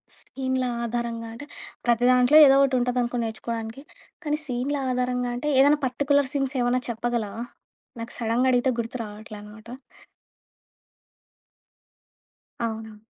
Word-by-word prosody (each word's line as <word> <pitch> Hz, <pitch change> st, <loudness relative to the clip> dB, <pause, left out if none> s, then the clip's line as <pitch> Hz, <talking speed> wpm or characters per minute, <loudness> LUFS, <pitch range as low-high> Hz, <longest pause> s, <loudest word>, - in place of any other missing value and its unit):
సీనులా 260 Hz, -1 st, -3 dB
ఆధారంగా 235 Hz, -1 st, -3 dB
అంటే, 255 Hz, +6 st, -9 dB, 0.4 s
ప్రతి 240 Hz, 0 st, +3 dB
దాంట్లో 250 Hz, +4 st, +5 dB
ఏదో 270 Hz, -1 st, +6 dB
ఓటి 270 Hz, -1 st, +1 dB
ఉంటదనుకో 245 Hz, 0 st, 0 dB
నేర్చుకోడానికి, 225 Hz, +2 st, -5 dB, 0.4 s
కానీ, 300 Hz, 0 st, 0 dB
సీనులా 270 Hz, +2 st, -2 dB
ఆధారంగా 250 Hz, 0 st, -1 dB
అంటే, 295 Hz, +5 st, -2 dB
ఏదైనా 290 Hz, +2 st, +5 dB
పర్టికులర్ 280 Hz, +2 st, +1 dB
సీన్స్ 275 Hz, -1 st, -1 dB
ఏమన్నా 245 Hz, +1 st, +1 dB
చెప్పగలవా? 230 Hz, -2 st, -3 dB, 0.6 s
నాకు 230 Hz, -, -6 dB
సడెన్‌గా 235 Hz, +3 st, +1 dB
అడిగితే 250 Hz, +1 st, +2 dB
గుర్తురాట్లే 220 Hz, -2 st, -6 dB
అనమాట. 210 Hz, +2 st, -13 dB, 3.0 s
అవును. 220 Hz, -1 st, -6 dB
245 Hz, 110 wpm, -25 LUFS, 230-260 Hz, 3.0 s, ఏదో